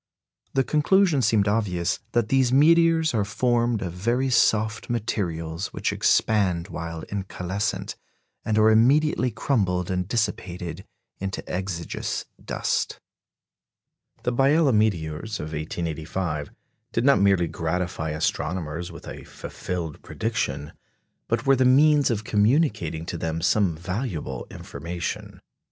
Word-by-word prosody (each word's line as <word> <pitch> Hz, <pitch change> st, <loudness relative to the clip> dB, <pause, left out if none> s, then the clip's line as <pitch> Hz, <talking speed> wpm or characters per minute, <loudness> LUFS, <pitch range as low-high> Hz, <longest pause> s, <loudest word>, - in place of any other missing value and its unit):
The 135 Hz, -, +4 dB
conclusion 155 Hz, +1 st, +3 dB
seemed 110 Hz, -3 st, +3 dB
obvious 100 Hz, -4 st, 0 dB
"that 120 Hz, -2 st, +1 dB
these 130 Hz, -2 st, +3 dB
meteors 165 Hz, +2 st, +5 dB
are 110 Hz, -3 st, +2 dB
formed 120 Hz, +1 st, +1 dB
of 90 Hz, -2 st, -4 dB
very 120 Hz, +8 st, 0 dB
soft 110 Hz, -2 st, +2 dB
materials, 90 Hz, -7 st, -2 dB
which -, -, -1 dB
expand 95 Hz, -5 st, +2 dB
while 85 Hz, -2 st, -5 dB
incalescent, 100 Hz, +1 st, -3 dB, 0.5 s
and 110 Hz, -1 st, 0 dB
are 110 Hz, 0 st, +6 dB
immediately 130 Hz, +4 st, +4 dB
crumbled 95 Hz, -, 0 dB
and 90 Hz, -1 st, -1 dB
dissipated 90 Hz, -6 st, -3 dB, 0.3 s
into 95 Hz, 0 st, -4 dB
exiguous 90 Hz, -2 st, -3 dB, 0.2 s
dust." -, -, -1 dB, 1.2 s
The 125 Hz, -, 0 dB
Biela 140 Hz, +2 st, +4 dB
meteors 100 Hz, -1 st, 0 dB
of 75 Hz, -, -5 dB
1885 80 Hz, 0 st, -3 dB, 0.4 s
did 115 Hz, -, +1 dB
not 140 Hz, -8 st, +5 dB
merely 100 Hz, -3 st, +4 dB
gratify 80 Hz, 0 st, -2 dB
astronomers 80 Hz, +2 st, -2 dB
with 85 Hz, -, -11 dB
a -, -, -8 dB
fulfilled 85 Hz, -4 st, -6 dB
prediction, 75 Hz, -11 st, -3 dB, 0.5 s
but 115 Hz, 0 st, -1 dB
were 135 Hz, 0 st, +5 dB
the 130 Hz, -, +2 dB
means 145 Hz, +3 st, +5 dB
of 110 Hz, -3 st, -1 dB
communicating 105 Hz, -, +1 dB
to 85 Hz, -, -5 dB
them 80 Hz, 0 st, -2 dB
some 90 Hz, -1 st, +2 dB
valuable 90 Hz, -, -4 dB
information. 85 Hz, +1 st, -6 dB
100 Hz, 120 wpm, -25 LUFS, 85-120 Hz, 1.2 s, are